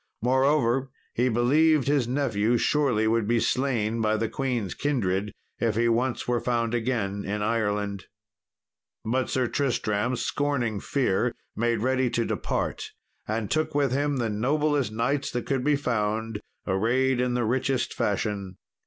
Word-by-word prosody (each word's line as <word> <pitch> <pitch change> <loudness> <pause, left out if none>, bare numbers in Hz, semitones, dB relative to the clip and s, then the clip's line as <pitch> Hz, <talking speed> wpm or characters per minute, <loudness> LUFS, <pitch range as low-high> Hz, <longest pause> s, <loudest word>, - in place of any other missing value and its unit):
Moreover, 130 0 +2 0.2
he 125 +2 +2
believed 140 +5 +3
his 140 -4 +2
nephew 120 -4 +1
surely 125 -6 +2
would 115 -1 +1
be 120 +1 +2
slain 115 -4 0
by 110 0 +2
the 115 - 0
queen's 120 -7 -2
kindred 105 -8 -1 0.3
if 115 -3 +1
he 120 +1 +2
once 120 +2 0
were 120 -1 +1
found 115 -1 -1
again 110 -5 -1
in 105 +1 -2
Ireland. 105 -3 -1 1.0
But 130 +3 0
Sir 130 -1 +1
Tristram, 120 -3 0
scorning 125 -6 -1
fear, 125 -2 0 0.2
made 115 -1 0
ready 130 0 +2
to 115 0 0
depart, - - -3 0.3
and 110 -1 -2
took 155 -2 0
with 140 -3 +2
him 145 +1 0
the 120 -2 0
noblest 140 +3 +1
knights 135 +6 0
that 120 - -3
could 135 -3 -1
be 150 +1 +3
found, 110 -4 -1 0.2
arrayed 125 +6 +1
in 125 -1 0
the 120 -2 +1
richest 130 +2 0
fashion. 100 -2 -2
120 Hz, 145 wpm, -26 LUFS, 110-130 Hz, 1.0 s, believed